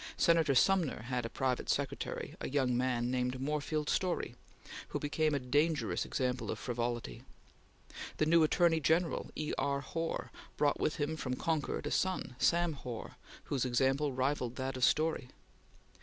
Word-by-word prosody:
Senator 165 -5 +4
Sumner 170 - +3
had 125 -1 -2
as - - -14
private 130 -2 -1
secretary - - -2
a - - -3
young 130 -3 +1
man 125 -1 0
named 125 0 -1
Moorfield 150 +2 -1
Storey, 180 -10 0 0.5
who - - -3
became 155 0 +1
a - - +1
dangerous 145 +5 +1
example 125 -2 -1
of - - -2
frivolity. 120 - -3 0.9
The 155 - +2
new 165 +1 +5
Attorney 165 +1 +4
General, 165 +3 +1
E. 150 - -2
R. 140 0 0
Hoar, 165 +4 -3 0.3
brought 145 -1 +2
with 155 - +1
him 155 0 -1
from 125 -4 -2
Concord 155 0 -1
a 150 - -2
son, 185 -9 0
Sam 170 +5 +3
Hoar, 125 -5 -7 0.3
whose 135 -3 -1
example 135 +3 +2
rivalled 130 -2 -1
that 130 0 -3
of 130 - -3
Storey. 155 -3 +2
140 Hz, 155 wpm, -33 LUFS, 125-155 Hz, 0.9 s, new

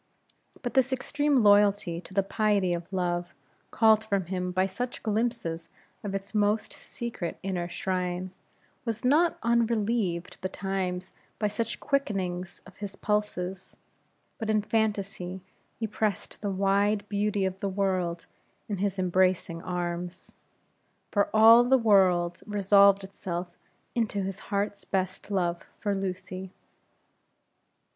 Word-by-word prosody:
But 245 - -3
this 265 0 +3
extreme 275 0 +1
loyalty 205 -4 +4
to 190 - -13
the 195 - +3
piety 200 -3 +1
of 170 +2 -5
love, 175 -2 -1 0.3
called 220 -1 +4
from 200 -4 0
him 180 0 -2
by 185 +1 +2
such 240 +6 -4
glimpses 215 -7 -1 0.3
of 200 -1 -3
its 195 +1 -5
most 210 +1 +1
secret 230 -8 -5
inner 180 -2 -2
shrine, 180 0 -2 0.5
was 230 0 -3
not 315 +6 +4
unrelieved 225 -6 0
betimes 185 -1 -3 0.2
by 210 - 0
such 225 +2 -3
quickenings 190 -10 -2
of 185 - -14
all - - -25
his 200 -1 -5
pulses, 195 -3 -2 0.6
that 220 -2 -3
in 215 -1 +2
fantasy 200 -4 -1 0.4
he 225 - -1
pressed 210 -2 -2
the 205 - -1
wide 200 +2 +1
beauty 205 -1 0
of 190 0 -3
the 200 - -1
world 185 -3 -1 0.4
in 205 - -2
his 200 0 -1
embracing 185 -2 +1
arms; 175 0 -4 0.8
for 200 -1 +2
all 225 +2 +8
his 260 +2 +4
world 185 -6 +3
resolved 200 -1 +5
itself 180 -2 -5 0.4
into 215 -4 0
his 195 +1 -4
heart's 200 0 -1
best 190 0 -2
love 175 -4 0 0.2
for 205 -2 0
Lucy. 185 -1 -4
195 Hz, 130 wpm, -28 LUFS, 185-215 Hz, 0.8 s, all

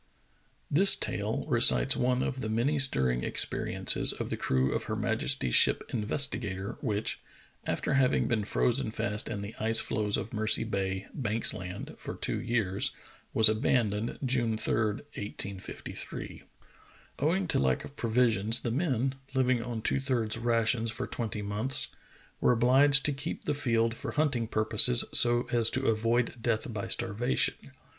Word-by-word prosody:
THIS 190 +7 +8
tale - - -2
recites 65 0 +4
one 125 +1 0
of 130 -1 -4
the 110 - -4
many 125 +7 0
stirring 65 - +3
experi - - 0
ences - - +3
of - - -4
the - - 0
crew 65 +1 0
of - - -3
her - - -3
majesty's 65 -2 0
ship - - +4
Investigatory 105 -4 -2
which, 105 -5 -2 0.5
after - - -2
having 135 -1 +2
been 110 -3 0
frozen 120 +4 0
fast 105 -1 -3
in 105 -3 -4
the 100 +2 -7
ice 115 +1 +3
floes 105 -1 -1
of 115 - -6
Mercy 110 0 +1
Bay, 95 -3 -3
Banks 115 -5 0
Land, 90 -4 -7
for - - -7
two - - -2
years, 110 -5 -1 0.4
was 110 0 +7
abandoned, 110 0 0
June 120 -3 0
3, - - -2
1853. 105 -4 -6 0.8
Owing 170 +6 0
to - - +1
lack 65 -2 0
of 140 - -13
provisions, 115 -3 +1
the 120 - -3
men, 135 -2 -1 0.2
living 130 -2 +1
on 115 -2 -6
two - - +1
thirds 125 -5 -1
rations 115 0 0
for - - -4
twenty 110 -3 -5
months, 105 +6 -3 0.5
were - - +3
obliged 135 +4 +4
to 145 - +1
keep 135 - -6
the 150 - 0
field 115 -5 0
for - - -6
hunting 140 -7 0
purposes 110 - +4
so 120 0 +4
as 115 -2 +2
to 130 +1 -2
avoid 115 +2 0
death 115 0 -2
by 105 -2 -4
starvation. 120 +2 +1
115 Hz, 155 wpm, -29 LUFS, 105-130 Hz, 0.8 s, THIS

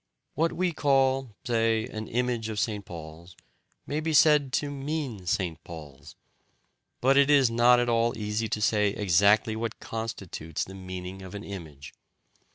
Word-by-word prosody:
What 165 +3 +1
we 180 0 0
call 135 -5 +1
(say) 115 -2 +1
an 110 -2 -6
image 120 -2 -1
of 105 -1 -3
St. 105 -2 -1
Paul's 85 0 -10 0.5
may 150 - -2
be 160 0 -2
said 150 -3 +5
to 145 0 0
"mean" 140 - -4
St. 85 -2 -1
Paul's. 75 -4 -11 0.9
But 135 +2 +4
it 140 0 +5
is 135 -5 +5
not 120 +1 +5
at 120 - +1
all 115 0 +1
easy 105 +1 -2
to 105 - -2
say 105 -1 +3
exactly 105 +3 +3
what 115 0 -4
constitutes 100 -8 -5
the 95 - -9
meaning 95 0 -7
of 95 +1 -9
an 100 - -6
image. 80 -9 -9
110 Hz, 160 wpm, -27 LUFS, 95-130 Hz, 0.9 s, said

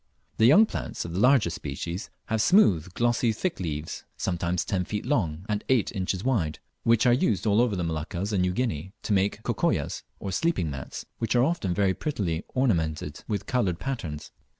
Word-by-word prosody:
The 110 - +6
young 200 - +8
plants - - -5
of 85 - -6
the 90 - -1
larger 125 -6 +4
species 85 +5 -5 0.2
have 110 -1 0
smooth 95 - +4
glossy 120 0 +2
thick 175 - -2
leaves, 80 -3 -4
sometimes 90 -1 -1
ten 95 -2 0
feet 105 +3 -4
long 90 - 0
and 105 -1 -1
eight 130 -5 +3
inches 95 0 -2
wide, 95 -13 0 0.2
which 115 0 +3
are 120 - +6
used 115 -5 +1
all 105 +1 +4
over 120 -4 +1
the 90 - -1
Moluccas 85 +5 -3
and 95 - +2
New 90 0 +2
Guinea, 95 - -2
to 105 - 0
make 100 +1 +1
"cocoyas" - - 0 0.2
or 95 - -4
sleeping 95 - 0
mats, 65 -1 -7
which 115 +1 0
are 120 - +5
often 130 - 0
very 100 -2 +2
prettily 95 - -2
ornamented 80 - 0
with 100 -3 -2
coloured 100 -9 0
patterns. 85 - -5
100 Hz, 185 wpm, -27 LUFS, 85-120 Hz, 0.2 s, young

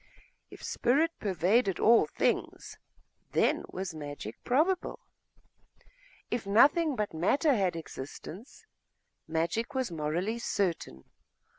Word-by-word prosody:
If - - -13
spirit 290 +7 +2
pervaded 195 +2 +1
all 230 +1 +5
things, - - -2 0.5
then - - +2
was 185 -1 -5
magic 145 -8 -8
probable; 320 +9 +1 1.3
if 235 -4 -2
nothing 290 +9 +4
but 210 -5 -2
matter 270 - +2
had 190 -7 +1
existence, 165 - -9 0.6
magic 170 - -1
was 260 -7 -1
morally 170 +8 -2
certain. 170 - -2
200 Hz, 100 wpm, -30 LUFS, 165-245 Hz, 1.3 s, all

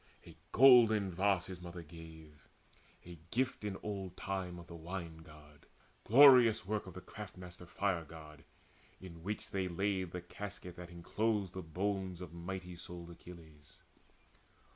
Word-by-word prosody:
A - - -13 0.2
golden 115 -6 +7
vase 95 0 +2
his 95 -2 -8
mother 85 0 -8
gave, 80 -2 -13 0.6
the 85 -2 -11
gift 130 0 -1
In 100 -2 -3
old 95 -3 -5
time 95 -2 -3
of 85 - -10
the 85 - -11
Wine 85 0 -6
god, 75 -2 -16 0.4
glorious 125 -4 +8
work 105 0 -2
Of 95 - -10
the 95 - -7
craft 105 -2 -9
master 90 -1 -10
Fire 95 -3 -1
god, 80 0 -12 0.6
in 95 -2 -10
the 85 - -13
which 100 +5 -4
They 95 -1 -1
laid 95 +1 -1
the 90 +1 -6
casket 100 -1 -7
that 90 -1 -8
enclosed 100 +3 -1
the 95 - -5
bones 95 +2 -2
Of 90 -2 -8
mighty 90 +1 -6
souled 85 0 -9
Achilles. 80 -4 -14
90 Hz, 155 wpm, -35 LUFS, 85-100 Hz, 0.6 s, glorious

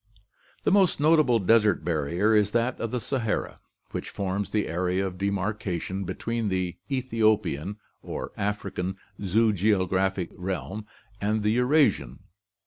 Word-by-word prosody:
The - - +2
most 190 -6 +4
notable 150 -5 +4
desert 105 -4 +3
barrier 85 +6 +1
is 105 -1 +4
that 120 +2 +1
of 115 - -2
the 125 - -2
Sahara, 115 -1 -2 0.3
which - - -4
forms 100 +1 -2
the 105 -1 0
area 90 +3 0
of 90 -1 -5
demarcation 100 -1 -2
between 115 +4 -2
the 90 -2 -2
Ethiopian 110 - 0 0.2
or - - -5
African 100 -2 -3 0.2
zoogeographical 95 -2 +1
realm 95 +3 -4 0.3
and 105 +1 0
the 105 - +3
Eurasian. 130 +6 +2
105 Hz, 125 wpm, -26 LUFS, 95-115 Hz, 0.3 s, most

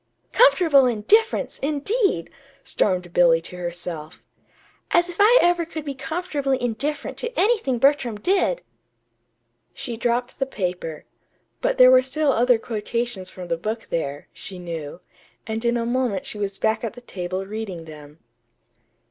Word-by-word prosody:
"'Comfortable 325 - +5
indifference,' 250 - +2
indeed!" 345 - 0 0.3
stormed 180 -3 0
Billy 170 -2 +5
to 165 +2 -9
herself. 175 -3 -6 0.7
"As 345 +1 +3
if 350 - -7
I 440 +5 +7
ever 350 0 +3
could 315 -2 -7
be 280 - -3
comfortably 285 -2 -2
indifferent 270 +5 -3
to 485 0 -4
anything 415 - +2
Bertram 255 -4 +2
did!" 360 - +1 1.1
She 235 -2 -5
dropped 240 +3 -1
the 270 - 0
paper; 180 - -4 0.6
but - - 0
there 255 0 +8
were 255 0 +7
still 275 +3 +1
other 245 0 +4
quotations 225 -3 -3
from 180 -1 -9
the 170 -1 -1
book 220 +6 -4
there, 145 -3 -3
she 190 - -8
knew; 165 -2 -6 0.4
and 220 0 -4
in 240 0 +2
a 230 - -1
moment 240 -5 -1
she 210 - -6
was 200 -1 -3
back 220 +1 0
at 230 - -3
the 245 - -12
table 185 -4 -5
reading 195 -5 -6
them. 150 -1 -12
235 Hz, 150 wpm, -23 LUFS, 185-285 Hz, 1.1 s, there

